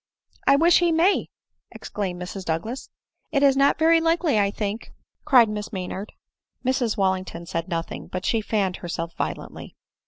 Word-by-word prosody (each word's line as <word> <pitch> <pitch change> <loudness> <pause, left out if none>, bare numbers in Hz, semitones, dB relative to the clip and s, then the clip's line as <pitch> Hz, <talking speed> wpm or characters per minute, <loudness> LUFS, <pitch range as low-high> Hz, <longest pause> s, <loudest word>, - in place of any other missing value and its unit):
" - - -32
I - - +7
wish 335 +4 +5
he 345 -1 +2
may 335 +5 +3 0.2
!" - - -54
exclaimed 185 -4 -5
Mrs 180 +2 -6
Douglas. 180 +11 -3 0.2
" - - -66 0.2
It 280 -2 +2
is 275 -1 +5
not 275 +1 +3
very 325 +1 +4
likely, 330 -6 +2
I 200 -1 +3
think," 205 +2 -4 0.3
cried 255 -6 +6
Miss 210 -1 -5
Maynard. 190 +1 -5 0.5
Mrs 250 -3 0
Wallington 185 -3 -1
said 165 +1 -3
nothing; 165 -2 -4
but 185 - -5
she 225 - +1
fanned 200 -4 -1
herself 170 -1 -5
violently. - - -5
210 Hz, 175 wpm, -24 LUFS, 185-280 Hz, 0.5 s, I